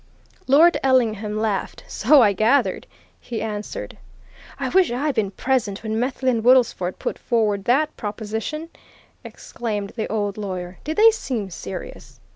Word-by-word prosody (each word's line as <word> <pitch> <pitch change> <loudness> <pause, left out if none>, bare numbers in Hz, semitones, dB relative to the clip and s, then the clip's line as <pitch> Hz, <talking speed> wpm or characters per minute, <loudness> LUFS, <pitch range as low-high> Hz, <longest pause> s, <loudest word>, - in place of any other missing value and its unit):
Lord 310 +6 +5
Ellingham 220 -5 +1
laughed. 215 -3 -2
"So 270 +4 +5
I 205 -2 +4
gathered!" 225 +8 +1 0.3
he 235 -3 -5
answered. 215 - -5 0.6
"I - - -2
wish 370 -7 +3
I'd 280 +4 -1
been 220 -5 0
present 215 -2 -1
when 220 0 -2
Methley 255 +1 0
and 230 -2 -1
Woodlesford 235 -7 +3
put - - -4
forward 210 -5 0
that 295 +5 +2
proposition," 220 +9 -5 0.5
exclaimed 210 -4 -5
the 220 -3 -3
old 205 -2 -2
lawyer. 185 -3 -5
"Did 310 +2 -4
they 450 +1 +8
seem 235 - -4
serious?" 100 - -8
225 Hz, 140 wpm, -22 LUFS, 205-265 Hz, 0.6 s, they